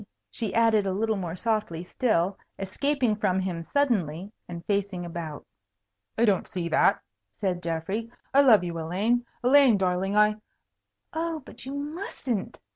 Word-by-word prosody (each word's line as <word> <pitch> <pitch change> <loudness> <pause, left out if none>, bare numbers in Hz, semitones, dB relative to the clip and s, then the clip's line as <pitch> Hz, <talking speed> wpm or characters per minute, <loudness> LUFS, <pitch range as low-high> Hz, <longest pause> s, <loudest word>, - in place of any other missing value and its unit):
she 220 -4 -3
added 225 -3 +4
a 190 - 0
little 220 +3 0
more 180 -4 -4
softly 210 -5 -1
still, 190 -2 +1 0.2
escaping 245 +4 0
from 190 -3 +1
him 180 -3 -3
suddenly, 200 - 0 0.2
and 170 -1 -7
facing 200 -3 -1
about. 165 -3 -6 0.7
"I 230 - +4
don't 200 -4 +2
see 175 -2 -3
that," - - +4 0.4
said 185 -4 -1
Geoffrey. 185 +8 -3 0.2
"I 280 - +7
love 225 -9 +6
you, 170 -1 -4
Elaine. 210 +9 0 0.2
Elaine, 260 -3 +6
darling, 190 +1 0
I 210 0 +4 0.4
" - - -55 0.3
"Oh, 325 -2 -2
but - - -10
you 275 - -4
mustn't!" 285 - -4
205 Hz, 150 wpm, -27 LUFS, 180-240 Hz, 0.7 s, I